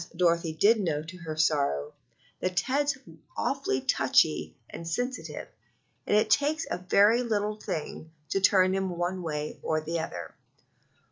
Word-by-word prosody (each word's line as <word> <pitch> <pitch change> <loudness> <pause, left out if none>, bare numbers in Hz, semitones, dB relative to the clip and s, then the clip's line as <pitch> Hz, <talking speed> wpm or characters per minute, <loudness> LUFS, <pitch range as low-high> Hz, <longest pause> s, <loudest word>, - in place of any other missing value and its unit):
Dorothy 170 -1 +2
did 215 +8 +4
know 155 -6 -1
to 170 +3 -10
her 160 -3 -6
sorrow), 140 - +1 0.5
that 185 -1 -2
Ted's 280 +6 +1 0.4
awfully 270 - 0
touchy 75 -8 +2
and 165 - -8
sensitive, 245 +9 -3 0.6
and 205 - +4
it 215 0 +2
takes 300 +6 +2
a - - -1
very 205 +6 +4
little 210 -3 -1
thing 160 -5 -5 0.2
to 195 - 0
turn 185 -1 +5
him 190 0 0
one 180 +2 -2
way 150 -3 -4
or 155 - 0
the 165 +2 -3
other. 160 - -6
180 Hz, 145 wpm, -28 LUFS, 160-215 Hz, 0.6 s, turn